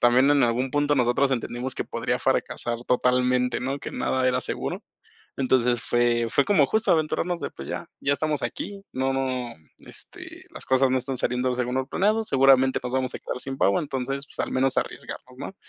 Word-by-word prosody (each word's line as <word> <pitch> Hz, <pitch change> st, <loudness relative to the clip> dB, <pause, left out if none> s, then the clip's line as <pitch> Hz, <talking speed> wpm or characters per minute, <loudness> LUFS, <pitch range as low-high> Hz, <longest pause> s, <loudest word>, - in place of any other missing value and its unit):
también 125 Hz, +4 st, +5 dB
en 145 Hz, -2 st, +4 dB
algún 125 Hz, +3 st, 0 dB
punto 145 Hz, +1 st, +2 dB
nosotros 130 Hz, +1 st, +2 dB
entendimos 125 Hz, +1 st, -3 dB
que -, -, -3 dB
podría -, -, -2 dB
fracasar 120 Hz, 0 st, -1 dB
totalmente, 125 Hz, 0 st, +2 dB
¿no?, 135 Hz, +2 st, -2 dB
que -, -, -6 dB
nada 130 Hz, -1 st, 0 dB
era 125 Hz, 0 st, +1 dB
seguro. -, -, -3 dB, 0.6 s
Entonces, 125 Hz, -3 st, +2 dB
fue 120 Hz, -1 st, +1 dB
fue 140 Hz, +4 st, +2 dB
como 160 Hz, -9 st, +4 dB
justo 220 Hz, +1 st, +1 dB
aventurarnos 170 Hz, +2 st, 0 dB
de, -, -, -3 dB
pues 70 Hz, -, -9 dB
ya, -, -, -5 dB
ya 145 Hz, -, +2 dB
estamos 150 Hz, +1 st, -1 dB
aquí, 200 Hz, -1 st, -5 dB
no 130 Hz, +1 st, 0 dB
no, 130 Hz, -2 st, -1 dB, 0.3 s
este, -, -, -12 dB
las -, -, -5 dB
cosas 130 Hz, 0 st, +3 dB
no 130 Hz, -, +3 dB
están 130 Hz, +1 st, -4 dB
saliendo 125 Hz, +1 st, 0 dB
según 125 Hz, 0 st, -2 dB
lo 130 Hz, 0 st, -1 dB
planeado, 215 Hz, +7 st, +1 dB
seguramente 135 Hz, -6 st, +4 dB
nos 125 Hz, 0 st, -4 dB
vamos 130 Hz, -1 st, -1 dB
a -, -, -6 dB
quedar -, -, -5 dB
sin 135 Hz, +1 st, -5 dB
pavo, 100 Hz, -5 st, +3 dB
entonces, 135 Hz, -1 st, -3 dB
pues, -, -, -12 dB
al -, -, -8 dB
menos 130 Hz, 0 st, +1 dB
arriesgarnos, 125 Hz, -, -4 dB
¿no?, 145 Hz, +8 st, -7 dB
130 Hz, 195 wpm, -25 LUFS, 125-140 Hz, 0.6 s, también